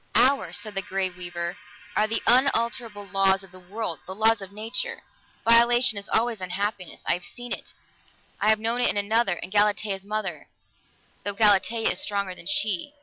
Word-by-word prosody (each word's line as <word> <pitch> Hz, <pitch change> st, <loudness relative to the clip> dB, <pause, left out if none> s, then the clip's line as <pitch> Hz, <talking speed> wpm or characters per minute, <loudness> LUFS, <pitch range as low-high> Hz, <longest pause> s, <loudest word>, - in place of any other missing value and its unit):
"Ours," 255 Hz, -11 st, +3 dB
said 215 Hz, -2 st, -6 dB
the 195 Hz, -, -2 dB
Grey 190 Hz, -1 st, -2 dB
Weaver, 175 Hz, -1 st, -5 dB, 0.4 s
"are 215 Hz, -, +3 dB
the 225 Hz, +1 st, -1 dB
unalterable 235 Hz, -4 st, +2 dB
laws 195 Hz, 0 st, +2 dB
of 190 Hz, -, -15 dB
the 185 Hz, -, -13 dB
world, 185 Hz, 0 st, -5 dB
the 190 Hz, -, -6 dB
laws 220 Hz, +1 st, +3 dB
of 195 Hz, 0 st, -9 dB
Nature. 220 Hz, +4 st, -4 dB, 0.4 s
Violation 235 Hz, 0 st, +5 dB
is 200 Hz, 0 st, -5 dB
always 225 Hz, -2 st, 0 dB
unhappiness. 190 Hz, 0 st, -4 dB
I -, -, +2 dB
have 175 Hz, +1 st, -4 dB
seen 245 Hz, 0 st, -6 dB
it; -, -, -8 dB, 0.6 s
I 210 Hz, -, +2 dB
have 220 Hz, -, +5 dB
known 230 Hz, +3 st, 0 dB
it -, -, +3 dB
in -, -, -1 dB
another, 205 Hz, 0 st, +2 dB
in 175 Hz, +2 st, -7 dB
Galatea's 205 Hz, -1 st, +1 dB
mother, 200 Hz, -7 st, -4 dB, 0.8 s
though 205 Hz, -, -2 dB
Galatea 215 Hz, +2 st, +3 dB
is -, -, -1 dB
stronger 200 Hz, -2 st, -1 dB
than -, -, -11 dB
she." 290 Hz, -, 0 dB
205 Hz, 180 wpm, -25 LUFS, 190-225 Hz, 0.8 s, Violation